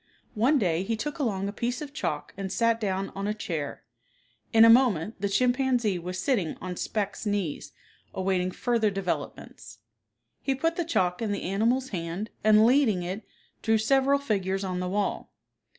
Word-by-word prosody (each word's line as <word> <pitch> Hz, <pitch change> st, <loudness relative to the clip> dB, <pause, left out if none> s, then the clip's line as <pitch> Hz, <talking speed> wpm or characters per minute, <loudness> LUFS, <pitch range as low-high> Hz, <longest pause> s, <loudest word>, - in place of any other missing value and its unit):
One 250 Hz, +8 st, +3 dB
day 175 Hz, -7 st, +1 dB
he 225 Hz, +4 st, -1 dB
took 295 Hz, +7 st, -4 dB
along 200 Hz, -8 st, -1 dB
a 200 Hz, -, -4 dB
piece 240 Hz, +5 st, -2 dB
of 290 Hz, -2 st, -7 dB
chalk 150 Hz, -, -3 dB
and 195 Hz, -1 st, -5 dB
sat 230 Hz, +3 st, +2 dB
down 195 Hz, -1 st, -1 dB
on 195 Hz, +1 st, -4 dB
a 210 Hz, -, -1 dB
chair. 160 Hz, -, -4 dB, 0.7 s
In 225 Hz, 0 st, +7 dB
a -, -, +8 dB
moment 225 Hz, -6 st, +4 dB
the 200 Hz, -, 0 dB
chimpanzee 245 Hz, -2 st, +1 dB
was 180 Hz, +2 st, -5 dB
sitting 190 Hz, -, 0 dB
on 180 Hz, 0 st, -5 dB
Specht's 205 Hz, +2 st, -3 dB
knees 200 Hz, -7 st, -2 dB, 0.4 s
awaiting 185 Hz, -1 st, 0 dB
further 230 Hz, +2 st, +1 dB
developments. 195 Hz, -2 st, -5 dB, 0.6 s
He 270 Hz, -, 0 dB
put 330 Hz, +5 st, 0 dB
the 345 Hz, -, -1 dB
chalk 180 Hz, -, 0 dB
in 220 Hz, -2 st, -1 dB
the 200 Hz, -, -3 dB
animal's 235 Hz, +7 st, +1 dB
hand, 175 Hz, +3 st, -4 dB
and 215 Hz, 0 st, +6 dB
leading 235 Hz, -7 st, +3 dB
it, 185 Hz, +5 st, -4 dB, 0.4 s
drew 225 Hz, 0 st, +3 dB
several 270 Hz, +5 st, +3 dB
figures 195 Hz, -8 st, -1 dB
on 185 Hz, -1 st, -2 dB
the 180 Hz, 0 st, -2 dB
wall. 200 Hz, +1 st, -2 dB
210 Hz, 170 wpm, -27 LUFS, 185-245 Hz, 0.7 s, a